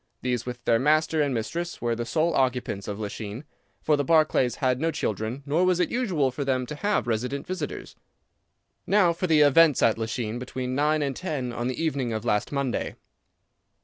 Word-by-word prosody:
These 125 -2 -1
with 120 -1 -6
their 115 -1 +3
master 155 +3 +2
and 145 -2 +1
mistress 165 +9 -3
were 120 -1 -1
the 120 0 -4
sole 160 +5 +1
occupants 125 -7 -1
of 105 0 -4
Lachine, 105 +3 -5 0.4
for 155 - +3
the 145 - 0
Barclays 145 -5 +3
had 130 -1 0
no 165 - +2
children, 110 - -3
nor 155 +5 +1
was 185 -1 +2
it 180 - +1
usual 180 - +1
for 135 +3 -4
them 130 -2 0
to 135 - -7
have 205 +5 0
resident 120 +4 -2
visitors. 185 +1 -5 0.9
"Now 190 -4 +4
for 180 +2 -2
the 155 -2 +4
events 150 0 +5
at 115 0 +3
Lachine 115 0 -3
between 125 0 -4
nine 150 +2 +2
and 140 -2 -2
ten 140 -9 -3
on 120 +1 -2
the 130 - -3
evening 140 -7 -1
of 110 +1 -4
last 105 -3 0
Monday." 140 -3 -2
135 Hz, 190 wpm, -26 LUFS, 120-155 Hz, 0.9 s, events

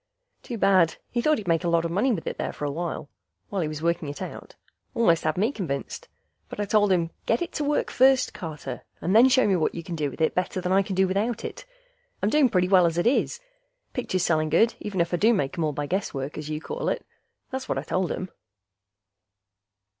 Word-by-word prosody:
Too 240 - -6
bad; 190 -5 +4 0.2
he 240 - 0
thought 305 +4 +3
he'd 205 - -7
make 165 0 +2
a - - 0
lot 170 0 +2
of 165 - -2
money 210 +9 +2
with 185 -8 -2
it - - -4
there - - -2
for 150 - -5
awhile, 155 +1 -3 0.4
while 195 -2 -1
he 160 - 0
was 155 0 -6
working 170 -3 0
it 145 - -7
out. - - -8 0.4
Almost 170 -9 +3
had 155 +1 0
me 215 +7 +2
convinced, 155 - -4 0.4
but - - -8
I 205 - 0
told 205 -1 +3
him, 170 -2 +1 0.2
"Get 230 +8 +2
it 345 - -6
to 300 - -2
working 295 +1 0
first, 260 0 +4
Carter, 150 -8 -6 0.2
and 185 +4 0
then 245 +4 +8
show 260 0 +4
me 195 - +3
what 160 -3 0
you 170 - -5
can 170 0 -5
do 150 -3 -1
with - - -11
it 160 - +2
better 180 +1 -1
than 180 0 -2
I 195 +1 +5
can 195 0 -4
do 190 0 +3
without 205 +5 -1
it. - - -7 0.6
I'm 205 - +2
doing 295 -4 +4
pretty 180 -3 +2
well 185 -2 +5
as 165 0 -2
is... 245 - +1 0.5
pictures 185 -8 -1
selling 155 -3 +1
good, 220 +9 +4
even 195 -4 -2
if 170 - -1
I - - +3
do 225 +5 +4
make 145 -1 -1
'em 170 - -1
all 155 - +1
by 145 0 -3
guesswork, 145 -6 -3
as 150 0 -6
you 155 0 -2
call 485 - -3
it." - - -3 0.5
That's 265 0 -5
what - - 0
I - - -2
told 185 -1 -1
him. 185 0 -4
185 Hz, 235 wpm, -25 LUFS, 165-220 Hz, 0.6 s, then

